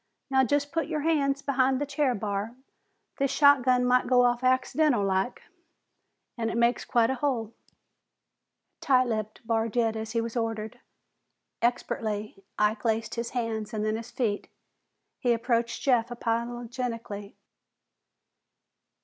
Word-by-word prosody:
"Now 265 0 +4
just 285 +3 0
put 330 -1 -1
your 310 -2 -2
hands 280 -3 +1
behin't 265 -1 +2
the 290 - -1
chair, 280 -2 0
Barr. 205 +3 -3 0.6
This 275 -1 +1
shotgun 260 -4 +4
might 250 0 +3
go 250 -1 +5
off 245 0 +2
accidental 255 0 +2
like, 190 +5 -1 1.0
an' 225 -1 0
it 230 - -3
makes 235 +1 +2
quite 235 0 +2
a 265 - -4
hole." 235 -6 -1 1.3
Tight 255 -2 +4
lipped, 215 0 -4
Barr 225 0 +1
did 225 -1 +1
as 220 0 -5
he 230 - +1
was 230 +1 -4
ordered. 225 0 -3 0.8
Expertly 215 -4 -2
Ike 210 +1 +1
laced 225 -1 0
his 235 0 -3
hands 220 -2 -3
and 215 0 -1
then 215 0 0
his 230 +1 -6
feet. 215 -5 -2 0.7
He 245 -3 +2
approached 235 0 -1
Jeff 240 -4 +3
apologetically. 235 -3 -4
235 Hz, 135 wpm, -27 LUFS, 225-255 Hz, 1.3 s, go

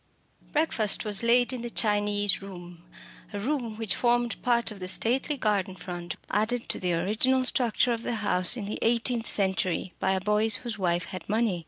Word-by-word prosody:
Breakfast 240 -11 +1
was 210 -1 +2
laid 245 +2 +3
in 250 - -4
the 240 - -4
"Chinese 205 -3 +1
room," 175 -3 -10 0.5
a 205 - -3
room 235 -2 -3
which 225 -3 -1
formed 240 -1 +1
part 235 -2 +1
of 205 - -10
the 185 - -6
stately 255 +9 +1
"garden 200 -5 0
front," 175 -2 -6 0.2
added 230 +3 0
to - - 0
the 180 -2 0
original 220 +9 +2
structure 245 -1 +1
of 230 - -4
the 235 - -2
house 200 0 +2
in 210 - -5
the 205 - -5
eighteenth 235 0 +1
century 190 -2 0
by 190 - +1
a 190 - 0
Boyce 210 +2 +2
whose 225 -3 -4
wife 175 -2 0
had 185 - -8
money. 215 -4 +1
215 Hz, 185 wpm, -27 LUFS, 190-235 Hz, 0.5 s, laid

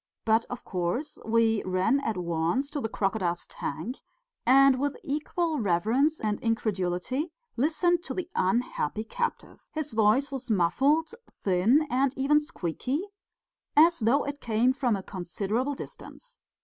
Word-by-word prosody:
But, 225 +1 +3
of 245 - -8
course, 185 - -2
we 225 -1 +3
ran 185 +8 +2
at 225 -7 -2
once 170 - -1
to 290 - -3
the 225 - -2
crocodile's 195 -5 -1
tank, 235 - -5 0.5
and 270 0 +6
with 285 +1 -1
equal 310 +2 -1
reverence 225 - +2
and 210 -1 -1
incredulity 225 - -1 0.2
listened 330 +6 +2
to - - -4
the 365 -3 -3
unhappy 215 -2 0
captive. 475 - -4
His 305 -3 -4
voice 220 +6 +3
was 265 -2 -5
muffled, 275 - +2 0.3
thin 210 - +3
and 265 +2 +1
even 285 +3 +4
squeaky, 280 - -3 0.7
as 335 +3 +6
though 235 +5 +3
it 285 0 -5
came 235 +3 +2
from 255 -5 +1
a 195 - -5
considerable 205 +9 -2
distance. - - -11
245 Hz, 135 wpm, -28 LUFS, 205-285 Hz, 0.7 s, and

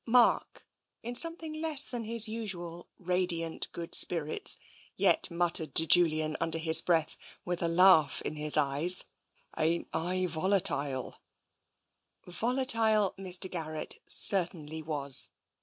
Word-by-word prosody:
Mark, 240 +1 +1 0.4
in 240 +2 -6
something 330 +3 +1
less 310 -3 +2
than 240 -3 -6
his 230 0 +3
usual 180 -6 -7
radiant 180 -2 -3
good 170 -1 -9
spirits, 160 -3 +4 0.4
yet - - +1
muttered 170 -4 -2
to 160 - +5
Julian 155 -2 +2
under 165 0 -2
his 160 0 +4
breath, 165 -3 -1 0.3
with 175 -1 -5
a 170 - 0
laugh 165 -4 +3
in - - -5
his 150 0 +4
eyes: 150 +5 +1 0.3
" - - -29
Ain't 165 +2 -1
I 180 +3 -2
volatile? 160 -6 -1 0.5
'' - - -47
Volatile 225 -1 +1
Mr. 185 0 0
Garrett 155 -4 -7
certainly 165 -5 +1
was. 145 -3 -2
175 Hz, 125 wpm, -28 LUFS, 160-200 Hz, 0.5 s, to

